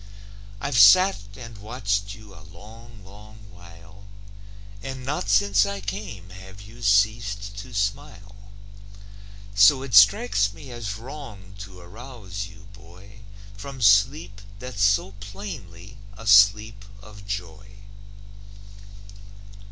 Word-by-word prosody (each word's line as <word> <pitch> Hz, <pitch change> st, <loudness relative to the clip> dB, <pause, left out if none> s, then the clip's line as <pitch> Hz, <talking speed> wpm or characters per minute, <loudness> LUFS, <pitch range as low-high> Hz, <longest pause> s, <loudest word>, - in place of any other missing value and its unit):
I've 125 Hz, +1 st, -1 dB
sat 150 Hz, -, +6 dB
and 115 Hz, -4 st, -11 dB
watched 100 Hz, -2 st, -3 dB
you 105 Hz, -2 st, -15 dB
a 100 Hz, -, -15 dB
long, 105 Hz, +3 st, -15 dB
long 105 Hz, +2 st, -15 dB
while, 95 Hz, +3 st, -16 dB, 0.7 s
And 130 Hz, -2 st, -7 dB
not 135 Hz, -7 st, -3 dB
since 100 Hz, 0 st, +3 dB
I 100 Hz, -1 st, -4 dB
came 95 Hz, -1 st, -7 dB
have 95 Hz, +1 st, -13 dB
you 110 Hz, +4 st, -14 dB
ceased 100 Hz, -1 st, +1 dB
to 125 Hz, +5 st, -10 dB
smile. 100 Hz, -2 st, -5 dB, 1.0 s
So 100 Hz, +7 st, +5 dB
it 135 Hz, -3 st, -8 dB
strikes 100 Hz, 0 st, +5 dB
me 140 Hz, -4 st, -12 dB
as 115 Hz, -4 st, -5 dB
wrong 115 Hz, -7 st, -11 dB
to 95 Hz, -2 st, -11 dB
arouse 100 Hz, 0 st, -9 dB
you, 100 Hz, +1 st, -16 dB
boy, 100 Hz, 0 st, -16 dB, 0.4 s
From 135 Hz, +7 st, -9 dB
sleep 105 Hz, 0 st, +2 dB, 0.2 s
that's 125 Hz, -2 st, -7 dB
so 100 Hz, -1 st, +2 dB
plainly 100 Hz, 0 st, -10 dB, 0.2 s
a 115 Hz, -, -11 dB
sleep 100 Hz, +1 st, +4 dB, 0.2 s
of 105 Hz, -1 st, -14 dB
joy. 95 Hz, -1 st, -6 dB
100 Hz, 115 wpm, -24 LUFS, 100-115 Hz, 1.0 s, sat